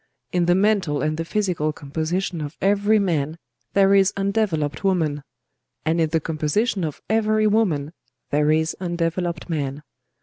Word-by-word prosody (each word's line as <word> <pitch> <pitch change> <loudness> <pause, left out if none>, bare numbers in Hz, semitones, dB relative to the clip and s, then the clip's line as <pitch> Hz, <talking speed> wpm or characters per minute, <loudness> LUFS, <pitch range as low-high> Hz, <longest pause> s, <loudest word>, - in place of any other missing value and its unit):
In 175 -1 +1
the 175 - +4
mental 190 -7 +2
and 155 0 0
the 165 - -2
physical 175 -5 -1
composition 160 +4 -3
of 150 +1 -6
every 205 +2 +3
man, 160 -6 0 0.4
there 195 0 +5
is 195 -1 +5
undeveloped 195 -7 0
woman; 160 -7 +1 0.6
and 165 +1 +2
in 160 - +2
the 165 +1 +1
composition 165 +7 -1
of 155 -3 -5
every 215 0 +2
woman 180 -9 +1 0.4
there 150 +1 +2
is 160 +1 +1
undeveloped 175 0 -2
man. 145 -3 -3
170 Hz, 145 wpm, -23 LUFS, 155-195 Hz, 0.6 s, there